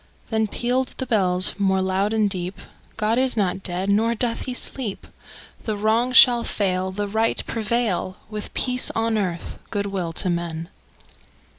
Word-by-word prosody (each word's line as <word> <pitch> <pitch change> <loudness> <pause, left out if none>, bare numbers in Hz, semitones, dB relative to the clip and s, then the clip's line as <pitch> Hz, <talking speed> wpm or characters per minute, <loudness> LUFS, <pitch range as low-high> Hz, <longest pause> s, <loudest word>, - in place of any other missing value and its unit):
Then 220 -1 +1
pealed 250 +4 -1
the 260 - -3
bells 185 -6 +2
more 190 -1 +2
loud 190 +2 0
and 220 -2 +2
deep: 185 -1 -2 0.4
"God 220 +2 +1
is 260 -2 +2
not 195 -2 0
dead; 185 0 -1
nor 225 +3 +2
doth 230 0 -1
he 255 - -3
sleep! 245 -6 -2 0.6
The 215 -2 -2
Wrong 225 +4 +2
shall 245 -2 +7
fail, 185 -2 0
The 205 +2 -3
Right 220 +2 0
prevail, 220 -4 -1
With 210 -1 -6
peace 250 -1 +3
on 225 0 +1
earth, 180 -5 -3
good 205 -2 -2
will 190 -4 -3
to 185 - -1
men!" 170 -1 -3
210 Hz, 160 wpm, -23 LUFS, 190-230 Hz, 0.6 s, shall